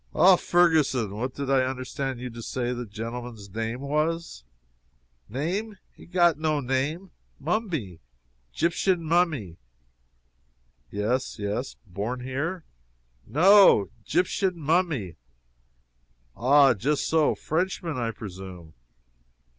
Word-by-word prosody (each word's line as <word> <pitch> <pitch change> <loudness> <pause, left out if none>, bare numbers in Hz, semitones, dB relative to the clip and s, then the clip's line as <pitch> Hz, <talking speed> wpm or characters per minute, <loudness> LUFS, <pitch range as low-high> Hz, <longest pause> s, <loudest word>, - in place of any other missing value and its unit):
"Ah, 190 0 +7
Ferguson 155 - +2
what 125 +4 -4
did 140 -1 -4
I 135 -1 +4
understand 130 0 -3
you 125 0 -6
to 115 0 -9
say 125 0 -2
the 120 -1 -5
gentleman's 115 0 -7
name 115 +3 -3
was?" 155 - -2 0.9
"Name? 185 - -3 0.2
he - - -15
got 175 -3 +3
no 155 -1 +1
name! 140 +8 -2 0.3
Mummy! 155 - -2 0.5
'Gyptian 175 - +1
mummy!" 155 - 0 1.3
"Yes, 115 +7 -1
yes. 105 +5 -3
Born 105 +7 -4
here?" 145 +8 -3 0.6
"No! 185 - +6
'Gyptian 180 - 0
mummy!" 155 - 0 1.2
"Ah, 135 +1 +5
just 140 +8 -1
so. 160 -2 +3
Frenchman, 165 -2 -2
I 115 -2 -1
presume?" 95 -6 -9
135 Hz, 105 wpm, -26 LUFS, 115-170 Hz, 1.3 s, Ah